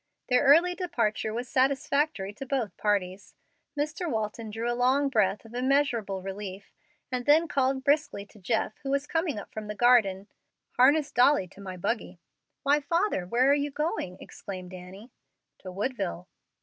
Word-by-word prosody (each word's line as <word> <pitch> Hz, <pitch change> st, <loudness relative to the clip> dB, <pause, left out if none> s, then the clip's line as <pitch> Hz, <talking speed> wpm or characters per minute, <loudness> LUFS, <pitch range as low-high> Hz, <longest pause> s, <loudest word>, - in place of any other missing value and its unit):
Their 250 Hz, 0 st, +4 dB
early 335 Hz, +6 st, +6 dB
departure 340 Hz, -, -1 dB
was 240 Hz, +3 st, -4 dB
satisfactory 270 Hz, -4 st, 0 dB
to 210 Hz, -, -8 dB
both 255 Hz, -6 st, -2 dB
parties. 195 Hz, -2 st, -2 dB, 0.4 s
Mr. 305 Hz, +4 st, -2 dB
Walton 220 Hz, -1 st, -3 dB
drew 225 Hz, +2 st, -4 dB
a 240 Hz, -, +1 dB
long 260 Hz, +4 st, +2 dB
breath 210 Hz, -4 st, +1 dB
of 225 Hz, -, -14 dB
immeasurable 245 Hz, -7 st, 0 dB
relief, 195 Hz, 0 st, -7 dB, 0.4 s
and 250 Hz, 0 st, -3 dB
then 315 Hz, +3 st, +5 dB
called 270 Hz, -2 st, 0 dB
briskly 285 Hz, -8 st, +1 dB
to 210 Hz, -, -19 dB
Jeff, 220 Hz, +2 st, -1 dB
who 270 Hz, -, -6 dB
was 280 Hz, +1 st, 0 dB
coming 325 Hz, -4 st, -1 dB
up 205 Hz, -, -8 dB
from 215 Hz, -1 st, -6 dB
the 210 Hz, -, -5 dB
garden, 205 Hz, -5 st, +4 dB, 0.5 s
"Harness 280 Hz, +4 st, +4 dB
Dolly 250 Hz, -5 st, +4 dB
to 200 Hz, -, -15 dB
my 185 Hz, -2 st, -7 dB
buggy." 185 Hz, -1 st, -3 dB, 0.4 s
"Why, 285 Hz, +1 st, +4 dB
father, 335 Hz, -, 0 dB
where 245 Hz, +7 st, +2 dB
are 280 Hz, -, +6 dB
you 290 Hz, 0 st, 0 dB
going?" 280 Hz, -, -3 dB
exclaimed 185 Hz, -2 st, -9 dB
Annie. 185 Hz, +6 st, -11 dB, 0.5 s
"To 185 Hz, -, -8 dB
Woodville." 195 Hz, -4 st, -3 dB
240 Hz, 160 wpm, -28 LUFS, 200-280 Hz, 0.5 s, early